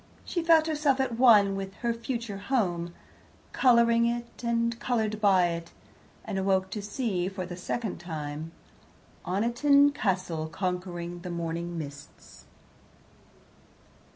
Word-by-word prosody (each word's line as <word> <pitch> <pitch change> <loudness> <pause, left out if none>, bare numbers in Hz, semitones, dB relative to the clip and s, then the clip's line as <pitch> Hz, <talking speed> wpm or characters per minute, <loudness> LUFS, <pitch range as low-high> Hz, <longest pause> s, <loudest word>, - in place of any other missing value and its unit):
She 345 - -2
felt 325 -1 +5
herself 295 -4 +1
at 245 -3 -1
one 210 -6 +6
with 195 0 -5
her 235 - +2
future 230 -3 -4
home, 185 -7 -1 0.6
colouring 235 -2 +4
it 235 0 -4
and 235 0 0
coloured 220 -3 -1
by 190 -4 +4
it, 170 0 -5 0.5
and 195 - -3
awoke 190 0 +1
to 210 - -4
see, 205 -4 -2
for 190 -2 -5
the 175 0 -7
second 210 +4 -4
time, 155 -2 -6 0.8
Oniton 245 +9 +4
Castle 185 - -1
conquering 175 0 -4
the 180 +1 -7
morning 170 0 -4
mists. 145 -1 -10
200 Hz, 125 wpm, -28 LUFS, 175-235 Hz, 0.8 s, one